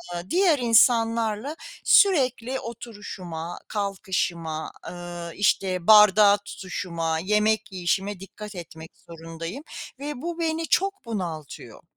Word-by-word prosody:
eee, 175 Hz, +2 st, -6 dB
diğer 350 Hz, -6 st, +3 dB
insanlarla 230 Hz, +2 st, +3 dB, 0.3 s
sürekli 265 Hz, -, +4 dB
oturuşuma, 190 Hz, -7 st, -7 dB
kalkışıma, 180 Hz, -6 st, -3 dB, 0.2 s
eee, 175 Hz, -1 st, -7 dB
işte, 185 Hz, -3 st, +1 dB
bardağı 210 Hz, -1 st, +7 dB
tutuşuma, 165 Hz, -4 st, -3 dB
yemek 210 Hz, +3 st, +1 dB
yiyişime 190 Hz, +2 st, -1 dB
dikkat 205 Hz, +1 st, -10 dB
etmek 160 Hz, -2 st, -10 dB
zorundayım 165 Hz, -, -8 dB, 0.4 s
ve 285 Hz, -2 st, -5 dB
bu 340 Hz, 0 st, -4 dB
beni 325 Hz, -1 st, -1 dB
çok 390 Hz, -7 st, 0 dB
bunaltıyor. 170 Hz, -9 st, -6 dB
205 Hz, 100 wpm, -25 LUFS, 175-235 Hz, 0.4 s, bardağı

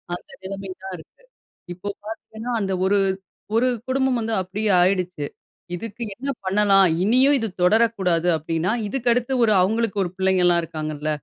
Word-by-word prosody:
அந்த -, -, -12 dB
நிலைமை 195 Hz, 0 st, -6 dB
தான் 190 Hz, -1 st, -6 dB
இருக்கு. 165 Hz, -, -18 dB, 0.5 s
இப்போ 185 Hz, +3 st, -6 dB, 0.2 s
பாத்தீங்கன்னா 220 Hz, +2 st, -7 dB
அந்த 195 Hz, -1 st, -1 dB
ஒரு, 200 Hz, +1 st, +3 dB, 0.6 s
ஒரு 250 Hz, +3 st, +3 dB, 0.2 s
குடும்பம் 265 Hz, -1 st, +1 dB
வந்து 225 Hz, 0 st, -2 dB
அப்பிடியே 205 Hz, +3 st, -1 dB
ஆயிடுச்சு, 180 Hz, -4 st, 0 dB, 0.5 s
இதுக்கு 230 Hz, +5 st, -6 dB
என்ன 270 Hz, +6 st, -5 dB, 0.2 s
பண்ணலாம் 195 Hz, 0 st, +4 dB, 0.2 s
இனியும் 260 Hz, +7 st, +4 dB
இது 225 Hz, -, -1 dB, 0.2 s
தொடரக்கூடாது 190 Hz, -4 st, +2 dB
அப்பிடின்னா 165 Hz, +6 st, -1 dB
இதுக்கு 245 Hz, +2 st, -1 dB
அடுத்து 245 Hz, +2 st, -1 dB
ஒரு 215 Hz, -, +3 dB
அவுங்களுக்கு 215 Hz, +1 st, 0 dB
ஒரு 175 Hz, -, -5 dB
பிள்ளைங்கலாம் 180 Hz, -2 st, +3 dB
இருக்காங்கல்ல, 155 Hz, -1 st, -4 dB
195 Hz, 145 wpm, -23 LUFS, 180-230 Hz, 0.6 s, பண்ணலாம்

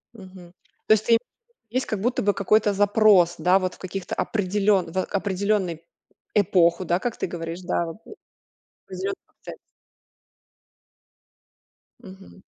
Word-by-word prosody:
Мгм. 185 Hz, -3 st, -13 dB, 0.3 s
То 215 Hz, -, +7 dB
есть 215 Hz, 0 st, +1 dB
ты 230 Hz, -1 st, +5 dB, 0.5 s
есть 255 Hz, +3 st, -1 dB
как 215 Hz, -, -3 dB
будто 245 Hz, +4 st, 0 dB
бы 205 Hz, 0 st, +2 dB
какой-то 205 Hz, +1 st, +2 dB
запрос, 200 Hz, -3 st, +4 dB
да, 180 Hz, +4 st, +3 dB
вот 185 Hz, -1 st, -3 dB
в -, -, -21 dB
каких-то 185 Hz, 0 st, -5 dB
определён 200 Hz, -3 st, 0 dB
в 185 Hz, +1 st, -1 dB
определенной 195 Hz, -3 st, -1 dB, 0.5 s
эпоху, 180 Hz, -3 st, +3 dB
да, 175 Hz, +2 st, +1 dB
как 240 Hz, +1 st, -4 dB
ты -, -, -2 dB
говоришь, 165 Hz, 0 st, -6 dB
да, 175 Hz, -1 st, -1 dB
вот 165 Hz, +4 st, -8 dB, 0.9 s
определённый 390 Hz, 0 st, -5 dB
процесс. -, -, -12 dB, 2.5 s
Мгм. 190 Hz, 0 st, -14 dB
190 Hz, 130 wpm, -24 LUFS, 180-210 Hz, 2.5 s, То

